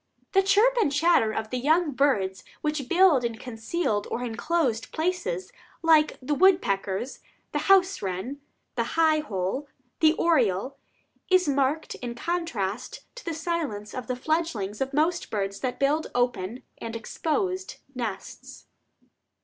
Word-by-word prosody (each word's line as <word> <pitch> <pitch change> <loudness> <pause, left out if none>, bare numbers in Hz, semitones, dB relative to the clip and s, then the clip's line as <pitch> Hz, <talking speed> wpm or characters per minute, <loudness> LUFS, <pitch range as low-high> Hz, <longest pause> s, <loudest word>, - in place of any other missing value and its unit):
The 390 - +5
chirp 415 +6 +4
and 290 - +2
chatter 290 -6 +3
of 220 0 -4
the 255 - -1
young 315 +5 +3
of 280 - -6
birds 195 -10 +1 0.2
which 300 -4 -2
build 350 -7 +5
in 235 -1 -1
concealed 225 -1 -2
or 245 - -3
inclosed 250 0 -1
places, 315 - -2 0.3
like 315 -2 +4
the 295 - 0
woodpeckers, 250 - +2 0.3
the - - -1
house 385 0 +5
wren, 195 +9 -4 0.3
the - - 0
high 315 -1 +4
hole, 220 +1 -3 0.3
the 315 -1 +5
oriole, 260 - +1 0.5
is 370 -3 +4
in 285 - +2
marked 280 +3 0 0.2
contrast 330 - -3
to - - -10
the 335 -3 -3
silence 310 -11 -3
of 255 - -5
the 255 - -1
fledglings 250 - -2
of 270 0 -1
most 320 +4 +1
birds 200 -2 -2
that 255 -2 -3
build 295 +3 +2
open 245 -2 -1 0.2
and 230 0 -5
exposed 370 - -2 0.2
nests. 225 -6 -6
275 Hz, 140 wpm, -26 LUFS, 225-335 Hz, 0.5 s, The